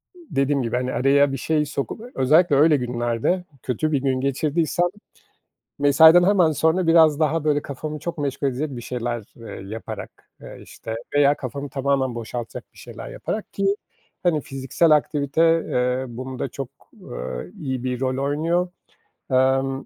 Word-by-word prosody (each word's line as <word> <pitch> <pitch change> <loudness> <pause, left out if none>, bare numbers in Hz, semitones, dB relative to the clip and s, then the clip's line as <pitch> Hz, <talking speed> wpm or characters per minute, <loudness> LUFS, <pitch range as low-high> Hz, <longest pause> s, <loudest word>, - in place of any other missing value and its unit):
dediğim 145 - -1
gibi, 115 0 -2
hani, 125 +1 -1
araya 140 +2 +3
bir 135 - -3
şey 150 +3 0
sokup, 140 - -4 0.2
özellikle 150 +4 +4
öyle 150 +1 +5
günlerde 120 +7 -1 0.2
kötü 145 +5 -1
bir 140 -3 +1
gün 130 -1 0
geçirdiysem, 155 +5 0 0.9
mesaiden 160 +5 +7
hemen 185 -5 +4
sonra 160 +4 +1
biraz 160 -2 +5
daha, 155 0 +1
böyle, 145 -1 +2
kafamı 150 +2 -6
çok 170 0 -5
meşgul 140 -1 -2
edecek 140 +4 -3
bir 120 - -7
şeyler, 120 -1 -3
eee, 110 -4 -9
yaparak, 110 +1 -8
eee, - - -10
işte, 110 - -8 0.2
veya 145 0 +5
kafamı 140 +2 -6
tamamen 135 -2 0
boşaltacak 115 0 -6
bir - - -19
şeyler - - -9
yaparak 215 - -5
ki, 195 0 +1 0.5
hani, 170 -4 +2
fiziksel 135 +5 0
aktivite, 150 0 +2 0.3
eee, 125 +1 0
bunda 130 +2 -5
çok, 135 -3 -6 0.3
eee, 60 0 -7
iyi 130 -3 -3
bir 125 -1 -2
rol 130 0 -1
oynuyor. 165 +5 0 0.6
Emm, 135 +1 +2
140 Hz, 150 wpm, -23 LUFS, 130-155 Hz, 0.9 s, mesaiden